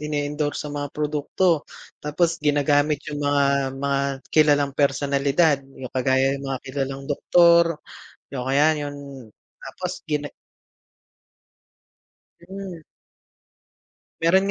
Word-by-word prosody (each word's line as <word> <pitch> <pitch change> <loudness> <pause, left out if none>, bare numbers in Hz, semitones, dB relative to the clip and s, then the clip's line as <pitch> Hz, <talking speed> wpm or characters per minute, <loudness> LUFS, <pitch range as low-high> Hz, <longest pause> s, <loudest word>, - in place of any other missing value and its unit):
ine-endorsong 150 0 -2
mga 145 0 -3
produkto, 150 +2 +1 0.4
tapos 165 +3 0
ginagamit 145 0 +2
yung 145 - -4
mga 145 0 +2 0.4
mga 140 -1 +1 0.3
kilalang 145 -2 +4
personalidad 140 +2 +2 0.2
yung 130 -1 -7
kagaya 130 +1 +2
ng - - -8
mga 135 -1 -2
kilalang 135 0 -3
doktor, 170 +3 +5 0.7
oh 125 - -3
kaya 140 +3 +4 0.2
yun, 145 - -6 0.7
tapos - - -5
gina 150 -1 -2 2.2
Mm. 190 -3 -7 1.4
Meron 190 +4 +3
145 Hz, 95 wpm, -23 LUFS, 140-155 Hz, 2.2 s, doktor